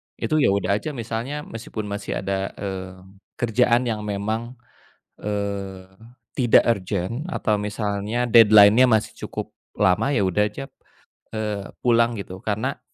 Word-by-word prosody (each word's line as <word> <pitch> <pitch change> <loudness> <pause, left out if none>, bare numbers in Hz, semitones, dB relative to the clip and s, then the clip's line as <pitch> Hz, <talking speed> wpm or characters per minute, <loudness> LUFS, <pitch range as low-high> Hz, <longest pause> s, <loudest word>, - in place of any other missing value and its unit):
itu 155 -1 0
ya - - +4
udah 100 +1 +1
aja 150 -3 -6
misalnya 120 +6 -4
meskipun 115 -1 -7
masih 100 -1 -4
ada, 95 0 -2
eee, 95 -2 -5 0.5
kerjaan 120 +1 +2
yang 110 -3 -2
memang, 110 +4 -3 0.6
eee, 100 -2 -4 0.5
tidak 120 -3 +5
urgent 100 - -1
atau 105 -2 0
misalnya 105 +3 -2
deadline-nya 110 +1 +7
masih 110 -3 +1
cukup - - -6 0.3
lama, 105 +8 +2
ya 120 - +2
udah 95 +2 +2
aja, 105 +6 -6 0.7
eee, 105 -2 -4 0.2
pulang 115 -1 +3
gitu 95 -1 -8
karena 110 +6 -2
105 Hz, 130 wpm, -23 LUFS, 100-120 Hz, 0.7 s, deadline-nya